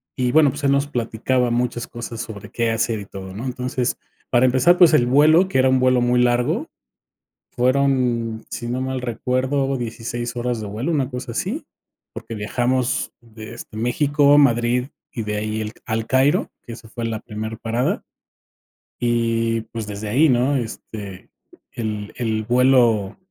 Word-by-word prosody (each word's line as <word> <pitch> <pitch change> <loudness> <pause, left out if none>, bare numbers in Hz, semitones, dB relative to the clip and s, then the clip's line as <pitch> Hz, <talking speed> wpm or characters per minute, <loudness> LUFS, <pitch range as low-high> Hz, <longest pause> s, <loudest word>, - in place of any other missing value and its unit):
y 125 -1 0
bueno, 155 -2 +5
pues, 145 +1 -8
él 140 - +3
nos 140 +1 +2
platicaba 125 0 0
muchas 120 0 -1
cosas 120 -1 -6
sobre 105 -4 -8
qué 115 -1 0
hacer 115 0 0
y 100 - -8
todo, 95 -1 -9
¿no? 115 +6 -6
Entonces 125 0 -2 0.3
para 125 0 +4
empezar, 130 +8 +4
pues, 170 -3 +7
el 120 -5 +5
vuelo, 155 +8 +5
que 175 -9 0
era 130 - +4
un 130 0 +3
vuelo 130 -1 +3
muy 125 0 +3
largo 120 0 +1 0.8
fueron, 125 -3 +1
si 120 - -5
no 125 +2 -2
mal 130 0 -2
recuerdo, 130 +3 -1
16 120 +1 -4
horas 120 -1 -2
de 105 - -5
vuelo, 110 +11 -3
una 140 -4 0
cosa 125 -1 -6
así, 210 - -3 0.5
porque 115 - -7
viajamos 120 +4 -1
de, 110 -1 -11
este, 115 -2 -10
México, 145 +5 +3
Madrid 125 -2 +3 0.2
y 115 - -4
de 105 0 -3
ahí 110 +1 -2
el 105 - -5
al 110 0 -2
Cairo, 135 +6 +2
que 120 - -9
esa 115 -1 -11
fue 115 +1 -6
la 110 -2 -3
primer 110 0 -6
parada. 115 +2 -1 1.0
Y, 115 -1 +1
pues, 115 -2 -5
desde 105 +1 -5
ahí, 150 +8 +4
¿no?, 130 +3 +2
este, 105 -5 -7 0.4
el 105 -3 -4
el 110 -3 -1
vuelo 120 -4 +3
120 Hz, 165 wpm, -21 LUFS, 115-130 Hz, 1.0 s, pues